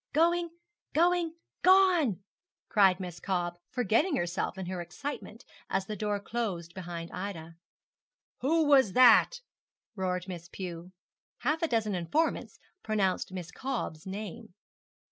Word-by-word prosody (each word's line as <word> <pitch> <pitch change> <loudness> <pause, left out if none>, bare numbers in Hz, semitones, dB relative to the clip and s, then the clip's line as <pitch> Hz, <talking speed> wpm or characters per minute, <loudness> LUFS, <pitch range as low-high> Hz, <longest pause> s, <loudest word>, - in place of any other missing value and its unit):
'Going, 340 +3 +3 0.4
going, 340 +1 +2 0.3
gone!' 360 - +4 0.5
cried 195 -3 +4
Miss 175 -2 -6
Cobb, 175 -2 -2
forgetting 250 - +1
herself 175 0 -2
in 190 - -4
her 180 0 -4
excitement, 285 +11 -7 0.2
as 195 - 0
the 215 - -5
door 210 0 -1
closed 195 -7 -4
behind 170 -2 -6
Ida. 170 -4 -6 0.9
'Who 315 +4 +2
was 270 -9 +5
that?' 255 - +6 0.5
roared 185 -1 -2
Miss 175 -2 -7
Pew. 175 -1 -7 0.5
Half 300 +6 0
a 330 - +2
dozen 225 -6 0
informants 190 - -1 0.2
pronounced 200 -4 0
Miss 180 -2 -6
Cobb's 235 -10 -4
name. 210 +1 -7
200 Hz, 125 wpm, -30 LUFS, 180-280 Hz, 0.9 s, that